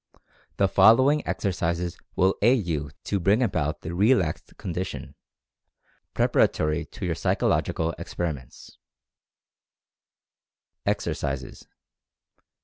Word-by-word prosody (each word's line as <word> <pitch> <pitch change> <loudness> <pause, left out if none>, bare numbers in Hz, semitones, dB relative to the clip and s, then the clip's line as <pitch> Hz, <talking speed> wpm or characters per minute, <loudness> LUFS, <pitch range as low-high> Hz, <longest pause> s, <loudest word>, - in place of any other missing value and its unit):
The 100 - +3
following 130 +10 +5
exercises 85 -2 -1 0.2
will 95 +1 +3
aid 120 -1 +4
you 75 -4 -2
to 100 - -1
bring 100 +7 +3
about 75 -9 -1
the 80 - -5
relaxed 95 -4 +1
con 90 - -5
dition, 90 +2 -5 1.0
preparatory 75 +1 +2
to - - -7
your - - 0
psychological 80 +1 0
experiments: 75 -8 -6 2.1
Exercises. 70 -2 -3
90 Hz, 90 wpm, -25 LUFS, 80-100 Hz, 2.1 s, following